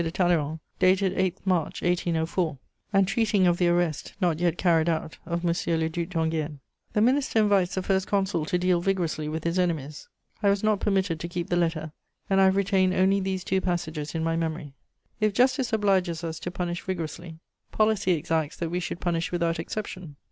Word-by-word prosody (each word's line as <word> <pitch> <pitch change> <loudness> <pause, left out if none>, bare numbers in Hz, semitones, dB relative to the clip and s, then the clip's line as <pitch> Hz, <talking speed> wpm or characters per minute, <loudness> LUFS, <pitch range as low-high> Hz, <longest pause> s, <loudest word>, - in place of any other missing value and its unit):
de 165 - -1
Talleyrand, 165 -3 +1 0.2
dated 185 0 +3
8 185 -1 0
March 180 -5 0
1804, 170 -2 0 0.3
and 195 -2 +3
treating 210 -3 +2
of 175 -1 +2
the 175 - +3
arrest, 175 -3 0
not 175 -5 +1
yet 175 -1 +1
carried 170 -2 +3
out, 160 -1 -3
of 170 0 -2
M. 170 - +3 0.3
le 160 0 0
Duc 170 +1 -3
d'Enghien. 160 -3 -1 0.4
The 210 - +2
Minister 260 +1 +2
invites 200 -4 +3
the 190 - -1
First 190 0 0
Consul 195 -4 0
to 180 - 0
deal 180 -1 +2
vigorously 170 -5 -1
with 160 +1 -4
his 170 +2 0
enemies. 155 -5 -2 0.3
I 205 - +4
was 200 +1 +1
not 215 -2 +2
permitted 190 -5 0
to 170 - -4
keep 175 0 -5
the - - +3
letter, 165 -3 0 0.4
and 195 0 +5
I - - +6
have 190 0 +4
retained 190 -1 +2
only 190 +2 +3
these 190 -1 -2
two 190 0 0
passages 160 -4 -3
in 160 - -1
my 165 0 0
memory: 160 -3 -3 0.5
"If 215 -2 +2
justice 255 0 +2
obliges 190 -6 +1
us 160 -1 -4
to - - -4
punish 175 -1 -3
vigorously, 170 -2 -5 0.3
policy 215 -4 +2
exacts 160 -1 -1
that 170 -2 -3
we 175 - 0
should 175 -1 -5
punish 170 -1 -1
without 170 -2 0
exception.................... 180 -3 -6
175 Hz, 195 wpm, -26 LUFS, 165-190 Hz, 0.5 s, I